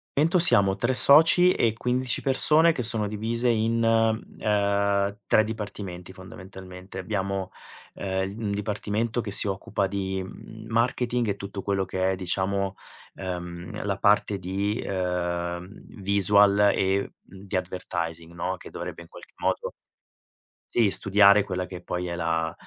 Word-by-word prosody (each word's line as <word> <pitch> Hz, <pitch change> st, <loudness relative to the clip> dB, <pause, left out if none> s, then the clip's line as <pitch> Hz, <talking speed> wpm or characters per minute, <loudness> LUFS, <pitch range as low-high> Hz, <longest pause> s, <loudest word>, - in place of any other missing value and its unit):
Dentro 165 Hz, +5 st, +3 dB
siamo 100 Hz, -, +5 dB
3 120 Hz, +5 st, 0 dB
soci 165 Hz, +7 st, +7 dB
e 115 Hz, -2 st, +1 dB
15 125 Hz, +2 st, -1 dB
persone 155 Hz, +5 st, +4 dB
che 135 Hz, -, -3 dB
sono 110 Hz, -2 st, 0 dB
divise 115 Hz, +4 st, -1 dB
in, 115 Hz, 0 st, +1 dB
ehm, 100 Hz, -3 st, +1 dB
3 110 Hz, -, +4 dB
dipartimenti 100 Hz, -5 st, -6 dB
fondamentalmente, 95 Hz, 0 st, -11 dB
abbiamo, 95 Hz, -1 st, -3 dB, 0.4 s
ehm, 95 Hz, 0 st, -3 dB
un 105 Hz, -3 st, -2 dB
dipartimento 105 Hz, +3 st, -2 dB
che 105 Hz, -3 st, -6 dB
si 100 Hz, -, +3 dB
occupa 95 Hz, +1 st, -2 dB
di, 95 Hz, -1 st, -3 dB
mhmm, 110 Hz, +3 st, -11 dB
marketing 120 Hz, +1 st, 0 dB
e 100 Hz, -, -1 dB
tutto 100 Hz, 0 st, -7 dB
quello 100 Hz, -1 st, -1 dB
che 95 Hz, 0 st, -1 dB
è -, -, -2 dB
diciamo, 95 Hz, +1 st, -1 dB, 0.4 s
ehm, 90 Hz, -1 st, -6 dB
la 100 Hz, -1 st, -1 dB
parte 100 Hz, 0 st, +2 dB
di, 100 Hz, +4 st, -2 dB
ehm, 90 Hz, -1 st, -3 dB, 0.3 s
visual 100 Hz, +1 st, +4 dB
e 95 Hz, +1 st, 0 dB
di 95 Hz, +1 st, -9 dB
advertising, 85 Hz, -2 st, -4 dB
no? 85 Hz, -, -3 dB
Che -, -, -12 dB
dovrebbe 85 Hz, -, -7 dB
in -, -, -17 dB
qualche -, -, -15 dB
modo -, -, -2 dB, 0.9 s
sì, 115 Hz, -4 st, +2 dB
studiare 100 Hz, +1 st, +5 dB
quella 90 Hz, -1 st, -3 dB
che 90 Hz, -1 st, -9 dB
poi 90 Hz, 0 st, -4 dB
è 85 Hz, -, -4 dB
la, 80 Hz, -1 st, -1 dB
100 Hz, 140 wpm, -25 LUFS, 95-110 Hz, 0.9 s, soci